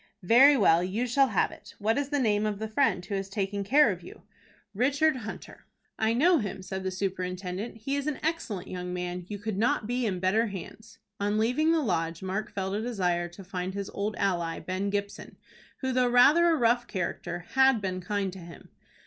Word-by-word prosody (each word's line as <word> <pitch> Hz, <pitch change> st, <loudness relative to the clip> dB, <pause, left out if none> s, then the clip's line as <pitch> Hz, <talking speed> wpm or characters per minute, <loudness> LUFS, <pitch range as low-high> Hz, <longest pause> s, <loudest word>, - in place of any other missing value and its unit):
"Very 265 Hz, +9 st, +7 dB
well. 165 Hz, -6 st, +4 dB
You 200 Hz, +7 st, -1 dB
shall 270 Hz, +3 st, +3 dB
have -, -, +1 dB
it. -, -, -14 dB
What 220 Hz, +2 st, +1 dB
is 285 Hz, -1 st, -1 dB
the 290 Hz, -, 0 dB
name 215 Hz, -5 st, +1 dB
of 210 Hz, -1 st, -2 dB
the 220 Hz, +2 st, -4 dB
friend 215 Hz, -6 st, +1 dB
who 205 Hz, -, -6 dB
has 195 Hz, 0 st, -3 dB
taken 200 Hz, 0 st, -2 dB
care 290 Hz, +9 st, +5 dB
of -, -, -6 dB
you?" -, -, -13 dB, 0.5 s
"Richard 275 Hz, +6 st, +2 dB
Hunter." 215 Hz, -3 st, -9 dB, 0.3 s
"I 220 Hz, +1 st, +2 dB
know 330 Hz, +6 st, +4 dB
him," 195 Hz, -3 st, -5 dB
said 190 Hz, 0 st, -5 dB
the 190 Hz, -, -1 dB
superintendent. 185 Hz, +2 st, -4 dB
"He 270 Hz, +6 st, -3 dB
is 285 Hz, +1 st, -2 dB
an 300 Hz, -, -1 dB
excellent 305 Hz, -, -2 dB
young 180 Hz, 0 st, -5 dB
man. 180 Hz, 0 st, -4 dB
You 205 Hz, -, -4 dB
could 205 Hz, -1 st, -4 dB
not 225 Hz, -1 st, +1 dB
be 245 Hz, +1 st, -1 dB
in 185 Hz, -3 st, -2 dB
better 205 Hz, +6 st, +2 dB
hands." 205 Hz, +3 st, -9 dB, 0.2 s
On 205 Hz, +1 st, 0 dB
leaving 250 Hz, +9 st, +2 dB
the 330 Hz, -1 st, +2 dB
Lodge 165 Hz, -, -1 dB
Mark 190 Hz, +3 st, -3 dB
felt 190 Hz, -1 st, -3 dB
a 210 Hz, -, -1 dB
desire 180 Hz, -7 st, -1 dB
to 175 Hz, +3 st, -12 dB
find 185 Hz, 0 st, -4 dB
his 200 Hz, -1 st, -4 dB
old 210 Hz, +1 st, -3 dB
ally, 175 Hz, -4 st, -1 dB
Ben 190 Hz, +2 st, -3 dB
Gibson, 200 Hz, 0 st, -4 dB, 0.4 s
who, 260 Hz, -1 st, -1 dB
though 250 Hz, -1 st, +2 dB
rather 290 Hz, +8 st, +6 dB
a 330 Hz, -, +4 dB
rough 240 Hz, -2 st, +2 dB
character, 175 Hz, -1 st, -4 dB
had 265 Hz, -2 st, +4 dB
been 185 Hz, -2 st, -3 dB
kind 195 Hz, 0 st, -2 dB
to 190 Hz, -, -9 dB
him. 170 Hz, -1 st, -12 dB
205 Hz, 210 wpm, -28 LUFS, 185-245 Hz, 0.5 s, Very